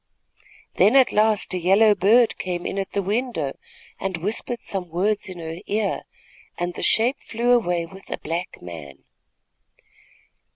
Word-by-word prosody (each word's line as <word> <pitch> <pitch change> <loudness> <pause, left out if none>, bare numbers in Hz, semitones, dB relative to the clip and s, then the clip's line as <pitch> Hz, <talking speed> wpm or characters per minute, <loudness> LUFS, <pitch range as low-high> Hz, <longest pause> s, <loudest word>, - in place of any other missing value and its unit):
"Then 220 - +5
at 265 -2 +6
last 215 -2 +2
a 185 - -1
yellow 200 +5 +5
bird 215 +5 +4
came 175 -2 -3
in 200 - -2
at 195 - -4
the 200 - 0
window 205 - -2 0.4
and 190 -2 -2
whispered 215 +6 -2
some 185 -3 -4
words 200 +5 0
in 185 - -8
her 165 -1 -6
ear, 210 0 -1 0.5
and 175 0 -2
the - - -7
shape 235 +5 +2
flew 235 +2 -1
away 175 -8 +2
with 190 +3 -14
a - - -3
black 170 +3 -5
man." 80 -6 -10
195 Hz, 155 wpm, -23 LUFS, 175-220 Hz, 0.5 s, at